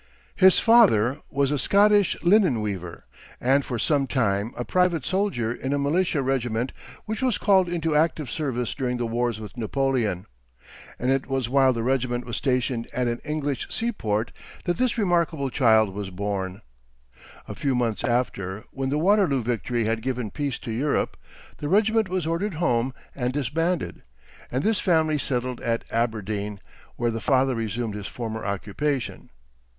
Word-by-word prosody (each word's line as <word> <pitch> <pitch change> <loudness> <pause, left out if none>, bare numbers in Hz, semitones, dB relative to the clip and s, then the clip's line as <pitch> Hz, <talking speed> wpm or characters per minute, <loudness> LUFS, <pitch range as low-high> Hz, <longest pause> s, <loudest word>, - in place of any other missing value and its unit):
His 190 -1 +6
father 150 - +5
was 140 0 +1
a 145 - 0
Scottish 205 +3 +4
linen 175 - +4
weaver, 95 -5 -5 0.3
and 135 +3 +3
for 125 - -3
some 140 +3 +1
time 110 -4 0
a 120 - -3
private 180 -5 +1
soldier 185 - 0
in 130 +3 -3
a - - +1
militia 150 +1 +1
regiment 125 -2 -1 0.3
which 220 +2 -4
was 255 -3 +2
called 190 -3 +3
into 165 -3 -1
active 155 -1 +1
service 125 -6 -2
during 125 -2 -2
the 120 - -1
wars 120 -1 -1
with 110 +2 -9
Napoleon; 120 -5 0 0.7
and 125 +2 0
it 135 -1 0
was 135 -3 -1
while 135 0 +4
the 115 -2 -2
regiment 125 -1 0
was 120 - -4
stationed 125 -3 0
at 125 0 0
an 120 0 -1
English 145 -2 -2
sea 235 +1 -1
port 110 - -2 0.3
that 175 - -1
this 250 -1 +1
remarkable 170 - +1
child 110 -7 +4
was 100 -1 -5
born. 95 0 -4 0.8
A - - -5
few 135 -3 -1
months 115 -3 -1
after, 110 -5 -1
when 135 -1 -3
the 145 - 0
Waterloo 180 - +3
victory 120 0 -1
had 115 +1 -1
given 125 -4 -3
peace 140 -4 -2
to 115 - -5
Europe, 135 +6 0 0.4
the 145 - -3
regiment 220 +1 +3
was 185 -3 -1
ordered 170 +4 -1
home 130 -6 +1 0.2
and 125 -2 -1
disbanded, 150 +5 -1 0.5
and 130 +3 -1
this 215 -3 +2
family 160 -4 +2
settled 125 -2 -2
at 115 0 -1
Aberdeen, 105 -3 -2 0.4
where 120 -1 0
the 115 0 -4
father 130 -1 +2
resumed 115 -1 -3
his 105 -1 -5
former 110 -2 -5
occupation. 110 +7 -3
130 Hz, 165 wpm, -25 LUFS, 115-155 Hz, 0.8 s, His